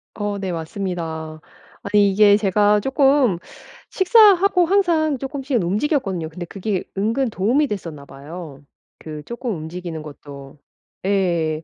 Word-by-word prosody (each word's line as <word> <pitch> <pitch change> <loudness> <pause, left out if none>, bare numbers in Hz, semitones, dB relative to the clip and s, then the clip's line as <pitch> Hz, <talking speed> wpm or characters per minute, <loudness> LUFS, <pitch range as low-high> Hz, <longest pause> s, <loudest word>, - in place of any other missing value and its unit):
어 205 -1 -3
네. 190 -2 -4
맞습니다. 160 -2 -5 0.4
아니 200 0 +3
이게 205 +1 +5
제가 210 0 +3
쪼끔 270 - +2 0.5
식사하고 390 -2 +5
항상 335 -7 +2
쪼끔씩은 270 -4 -2
움직였거든요. 195 - -1
근데 175 +2 -7
그게 195 +1 -3
은근 230 +6 0
도움이 240 +11 +1
됐었나 165 - -6
봐요. 145 +1 -10 0.4
그 155 -1 -8
쪼끔 235 - -4
움직이는 160 0 -6
것도. 140 -1 -12 0.5
예. 170 -5 0
195 Hz, 280 characters per minute, -21 LUFS, 160-260 Hz, 0.5 s, 이게